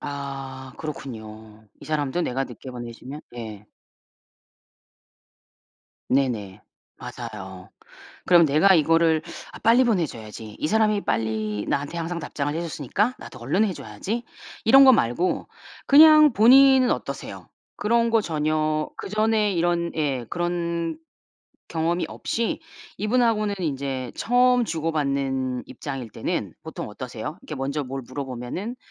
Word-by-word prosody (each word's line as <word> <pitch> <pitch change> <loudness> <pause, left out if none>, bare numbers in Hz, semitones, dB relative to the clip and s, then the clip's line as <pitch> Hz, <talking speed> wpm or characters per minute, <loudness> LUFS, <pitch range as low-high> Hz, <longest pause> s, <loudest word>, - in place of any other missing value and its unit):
아 135 -2 -6
그렇군요. 110 -7 -8
이 - - -11
사람도 155 +2 -1
내가 135 -2 -1
늦게 130 +1 -10
보내주면 125 +4 -8 0.2
예. 110 -3 -8 2.4
네네. 110 -7 0 0.4
맞아요. 95 -3 -8 0.6
그럼 175 -2 +7
내가 155 +7 +5
이거를 165 0 +3 0.3
'아 - - -10
빨리 235 +3 +5
보내줘야지. 115 - -3
이 - - -1
사람이 215 +1 +2
빨리 110 -2 -1
나한테 145 +4 -2
항상 170 +1 -3
답장을 145 -1 -3
해줬으니까 170 - -1
나도 - - -11
얼른 145 - +1
해줘야지.' 195 - -4 0.4
이런 270 +5 +8
거 260 - +9
말고 125 - +1 0.4
그냥 305 0 +8
본인은 260 +3 +6
어떠세요? - - -5 0.3
그런 230 +2 +2
거 225 -1 +4
전혀 155 -2 0
그전에 215 0 +1
이런 170 -1 0
예 140 -6 -1
그런 170 - -2 0.7
경험이 170 +2 0
없이 230 -1 -2 0.4
이분하고는 215 -1 +1
이제 135 -5 -3
처음 250 0 +3
주고받는 140 - -1
입장일 135 -6 -6
때는 - - -3
보통 - - -6
어떠세요? 125 +6 -7
이렇게 150 - -7
먼저 140 +2 -2
뭘 135 +1 -5
물어보면은 135 - -5
155 Hz, 275 characters per minute, -24 LUFS, 130-205 Hz, 2.4 s, 거